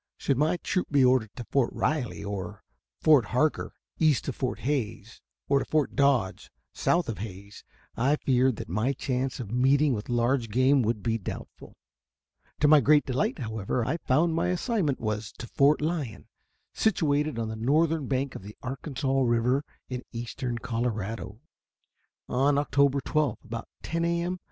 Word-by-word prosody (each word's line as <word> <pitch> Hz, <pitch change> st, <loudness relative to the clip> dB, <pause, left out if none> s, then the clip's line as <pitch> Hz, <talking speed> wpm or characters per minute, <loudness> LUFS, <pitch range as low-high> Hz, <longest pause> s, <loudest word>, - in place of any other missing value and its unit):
Should 135 Hz, -, 0 dB
my 155 Hz, +5 st, +2 dB
troop 185 Hz, +1 st, -2 dB
be 140 Hz, -3 st, +4 dB
ordered 125 Hz, -4 st, +3 dB
to 120 Hz, -, -6 dB
Fort 135 Hz, -4 st, +2 dB
Riley, 135 Hz, -9 st, -1 dB
or 100 Hz, -3 st, -5 dB, 0.4 s
Fort 150 Hz, -7 st, +5 dB
Harker, 145 Hz, +8 st, 0 dB, 0.2 s
east 155 Hz, -5 st, +2 dB
of 135 Hz, -, -2 dB
Fort 130 Hz, -2 st, -3 dB
Hays, 115 Hz, -5 st, -3 dB, 0.3 s
or 140 Hz, 0 st, +3 dB
to -, -, -3 dB
Fort 155 Hz, -2 st, 0 dB
Dodge, 135 Hz, -9 st, +1 dB, 0.2 s
south 175 Hz, 0 st, +1 dB
of 115 Hz, -, -4 dB
Hays, 100 Hz, -1 st, -8 dB, 0.3 s
I 135 Hz, +5 st, +2 dB
feared 130 Hz, -3 st, +2 dB
that -, -, -7 dB
my 110 Hz, -, 0 dB
chance 130 Hz, 0 st, -2 dB
of 115 Hz, -5 st, -6 dB
meeting 135 Hz, +3 st, +3 dB
with 105 Hz, 0 st, -5 dB
large 120 Hz, 0 st, +1 dB
game 130 Hz, +5 st, +4 dB
would 110 Hz, -2 st, -1 dB
be 115 Hz, -1 st, 0 dB
doubtful. 95 Hz, -, -8 dB, 0.9 s
To 150 Hz, -, +5 dB
my 150 Hz, 0 st, +8 dB
great 150 Hz, +3 st, +4 dB
delight, 130 Hz, 0 st, -1 dB
however, 110 Hz, 0 st, -2 dB
I 150 Hz, +7 st, -1 dB
found 160 Hz, +3 st, +2 dB
that -, -, -2 dB
my -, -, +1 dB
assignment 180 Hz, -, 0 dB
was 110 Hz, -1 st, -3 dB
to -, -, -8 dB
Fort 140 Hz, +5 st, +3 dB
Lyon, 150 Hz, -8 st, -3 dB, 0.5 s
situated 150 Hz, -, +1 dB
on 115 Hz, -1 st, -2 dB
the 110 Hz, -, -4 dB
northern 150 Hz, +5 st, +1 dB
bank 135 Hz, 0 st, -1 dB
of -, -, -8 dB
the 105 Hz, +2 st, -11 dB
Arkansas 135 Hz, 0 st, -2 dB
River 125 Hz, +3 st, +2 dB, 0.2 s
in 125 Hz, -1 st, -4 dB
eastern 120 Hz, +1 st, -4 dB
Colorado. 115 Hz, -2 st, -3 dB, 0.9 s
On 140 Hz, +3 st, +2 dB
October 140 Hz, -1 st, +2 dB
12 150 Hz, -4 st, 0 dB
about 115 Hz, 0 st, -6 dB, 0.2 s
10 165 Hz, +1 st, -2 dB
A. 170 Hz, 0 st, +1 dB
M. 180 Hz, +1 st, -3 dB
130 Hz, 165 wpm, -27 LUFS, 115-145 Hz, 0.9 s, my